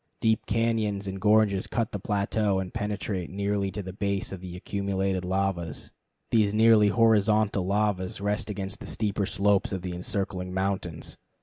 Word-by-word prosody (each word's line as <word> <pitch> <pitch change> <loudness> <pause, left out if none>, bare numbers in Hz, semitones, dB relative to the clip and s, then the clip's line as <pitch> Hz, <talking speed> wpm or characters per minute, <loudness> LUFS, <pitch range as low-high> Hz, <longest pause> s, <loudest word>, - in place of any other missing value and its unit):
Deep 110 -1 +1
cañons 110 -3 0
and 95 0 -5
gorges 105 -2 +3
cut 115 -2 -1
the 100 - -4
plateau, 100 +1 0
and 95 -1 -3
penetrate 100 -3 -3
nearly 100 0 -1
to 95 +2 -5
the 95 0 -7
base 100 -1 -2
of 95 -2 -7
the 90 -1 -7
accumulated 95 -1 -1
lavas. 90 -4 -2 0.4
These 105 -2 +3
nearly 110 -1 +6
horizontal 105 -3 +3
lavas 100 -2 0
rest 105 +2 -1
against 100 -2 -4
the - - -8
steeper 105 -2 -1
slopes 100 0 +2
of 95 -2 -3
the 90 -1 -4
encircling 90 0 -3
mountains. 95 -4 -2
100 Hz, 160 wpm, -27 LUFS, 95-105 Hz, 0.4 s, nearly